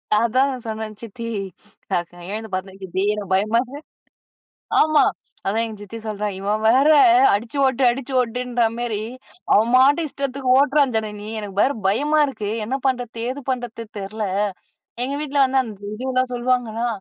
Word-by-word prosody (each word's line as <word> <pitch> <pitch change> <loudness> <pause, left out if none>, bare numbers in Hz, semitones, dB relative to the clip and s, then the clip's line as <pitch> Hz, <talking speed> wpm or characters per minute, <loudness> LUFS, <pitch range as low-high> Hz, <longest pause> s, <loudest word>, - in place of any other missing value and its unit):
அதான் 255 +5 +2
சொன்னேன், 220 -1 -4
சித்தி 230 +1 -8 0.7
அ - - +4 0.3
எழுந்து 220 +1 -5
பாத்தேன். 190 +1 -5
சித்தி 190 +1 -3
எனக்கு 200 -3 -3
பயமா 215 +4 +2 1.2
ஆமா, 310 -1 +5 0.4
அதான் 220 +4 +1
எங்க 220 -2 -8
சித்தி 225 +3 -8
சொல்றா, 210 -1 -3
இவ 195 +1 -5 0.2
வேற 260 +6 +5 0.5
அடிச்சு 225 +6 -3
ஓட்டு, 260 0 0
அடிச்சு 265 +2 -5
ஓட்டுன்ற 245 0 -1
மாரி, 235 -3 -2 0.5
அவன் 225 +3 +4
பாட்டுக்கு 285 +5 +5
இஷ்டத்துக்கு 275 -2 -2
ஓட்றான் 280 -2 +3
ஜனனி. 210 -1 -3
எனக்கு 205 -2 -7
வேற 275 - +3
பயமா 290 +10 +2
இருக்கு. 215 -7 -4
என்ன 260 +5 -2
பண்ணுறது 245 -3 -2
ஏது 265 +3 -4
பண்ணுறது 245 -3 -4
தெரியல. 210 +2 -4 0.8
எங்க 275 - -2
வீட்ல 290 -1 0
வந்து 265 0 +1
அந்த 205 -4 -8
இதுலாம் 255 +2 -1
சொல்லுவாங்களா, 240 -2 0
235 Hz, 145 wpm, -21 LUFS, 215-260 Hz, 1.2 s, ஆமா